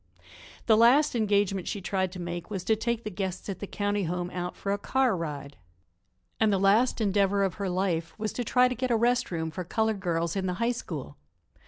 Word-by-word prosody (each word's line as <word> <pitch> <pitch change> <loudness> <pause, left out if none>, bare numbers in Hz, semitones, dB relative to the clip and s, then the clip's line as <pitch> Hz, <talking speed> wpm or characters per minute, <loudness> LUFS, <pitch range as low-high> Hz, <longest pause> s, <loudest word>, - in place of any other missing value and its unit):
The 220 - +5
last 255 +7 +5
engagement 200 -4 +1
she 205 - -3
tried 190 -1 -1
to 185 - -7
make 175 -1 -5
was 195 -4 -4
to 220 - +2
take 235 +1 -2
the 215 - -5
guests 190 0 -4
at 190 - -4
the 205 - -5
county 205 -1 -1
home 175 +1 -3
out 180 0 -4
for 200 - -3
a 200 - 0
car 260 0 +1
ride. 145 -4 -5 0.8
And 220 -1 +4
the 195 - +3
last 205 +7 +3
endeavor 200 -1 +2
of 190 -3 0
her 195 - -1
life 175 -3 -1
was 215 0 -3
to 245 - -2
try 250 +2 +4
to 250 - -2
get 255 +1 -2
a 235 - +3
rest 245 +2 +2
room 160 -2 -3
for 180 - -5
colored 220 +3 0
girls 170 -2 -1
in 190 -1 -1
the 180 - -1
High 235 +5 +1
School. 235 - -7
200 Hz, 220 wpm, -28 LUFS, 180-220 Hz, 0.8 s, The